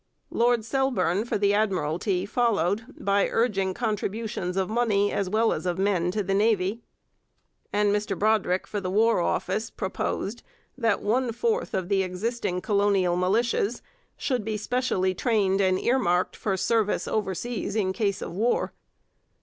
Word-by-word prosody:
Lord 235 -1 +2
Selborne 225 -7 +1
for 240 - -1
the 200 0 +2
Admiralty 185 -2 0
followed 215 -2 +1
by 200 0 +2
urging 195 -5 0
contributions 210 -4 -2
of 190 -1 +1
money 215 -3 +1
as 195 -2 -1
well 220 +3 +2
as - - -4
of 175 0 -1
men 190 -3 +1
to 205 +3 -1
the 195 +1 -1
navy. 205 +1 +1 0.9
And 205 0 +2
Mr 205 -2 -2
Brodrick 205 -3 +1
for 205 - -4
the 185 - -3
War 225 +3 +3
Office 200 +5 -1
proposed 200 +3 -3 0.3
that 230 -5 0
one 240 +4 +1
fourth 455 - -1
of 185 -2 -1
the 195 0 +2
existing 185 0 -2
colonial 200 -4 +2
militias 215 +4 +1 0.4
should 250 -5 -1
be 215 0 -2
specially 210 -5 0
trained 200 -2 +1
and 185 -1 +2
earmarked 185 -8 +1
for 195 -3 -2
service 215 +2 +1
overseas 210 +1 -2
in 190 -4 +1
case 200 0 -1
of - - -6
war. 230 +5 0
205 Hz, 150 wpm, -26 LUFS, 190-225 Hz, 0.9 s, War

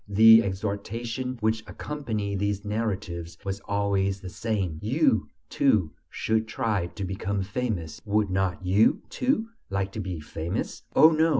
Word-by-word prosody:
The 110 +2 +8
exhortation 110 +6 -3
which 110 +1 +1
accompanied 110 -9 -3
these 100 0 -1
narratives 100 -6 -3
was 100 0 -2
always 100 -1 +1
the 95 -1 -7
same: 95 -9 -2
"You, 115 0 +2 0.2
too, 105 - +2 0.2
should 110 0 0
try 110 -5 0
to 90 +3 -7
become 95 +1 -2
famous; 95 -8 -3
would 105 -2 +1
not 95 -1 0
you, 100 +5 +4
too, 250 -3 0 0.2
like 95 0 -1
to 110 - -6
be 90 -4 -4
famous?" 80 +6 -4
"Oh, 160 - +8
no!" 160 +1 +3
100 Hz, 140 wpm, -27 LUFS, 95-110 Hz, 0.2 s, The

